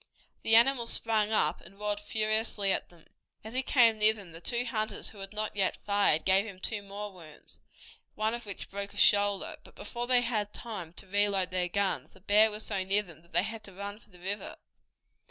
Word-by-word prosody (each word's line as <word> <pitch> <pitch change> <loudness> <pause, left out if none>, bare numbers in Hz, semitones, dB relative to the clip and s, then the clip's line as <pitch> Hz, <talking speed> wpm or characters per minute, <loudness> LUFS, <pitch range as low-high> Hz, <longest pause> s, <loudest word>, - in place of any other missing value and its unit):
The 225 - +4
animal 240 0 +4
sprang 220 -2 +1
up 220 - +2
and 195 - -17
roared 210 0 -1
furiously 215 -1 0
at - - -2
them. 170 -2 -20 0.4
As 220 +2 -9
he 260 - +2
came 235 -4 +4
near 215 +1 +7
them 200 -5 -12
the 165 +1 -10
two 240 +7 0
hunters 215 -2 -2
who 210 - -13
had 195 0 -7
not 215 0 -2
yet 195 -2 +1
fired 200 -6 +3
gave 190 +1 +5
him 200 -4 -9
two 205 +2 -1
more 200 +1 -7
wounds, 160 -5 -12 0.6
one 215 +1 0
of 235 -2 -6
which 200 - -7
broke 200 0 -5
a - - -12
shoulder, 205 -1 +3
but - - -17
before 240 0 -5
they 250 -1 +4
had 215 -4 -2
time 205 -9 -6
to 185 - -6
reload 195 -1 +1
their 180 -1 0
guns, 200 +1 -1
the 190 - -18
bear 210 +3 +5
was 215 +1 -5
so 195 -3 -1
near 200 +2 +2
them 165 -5 -14
that 170 - -25
they - - +3
had 220 +1 -6
to 195 - -13
run 200 +2 -5
for 210 - -22
the 180 - -16
river. 195 +4 -4
205 Hz, 220 wpm, -30 LUFS, 195-220 Hz, 0.6 s, near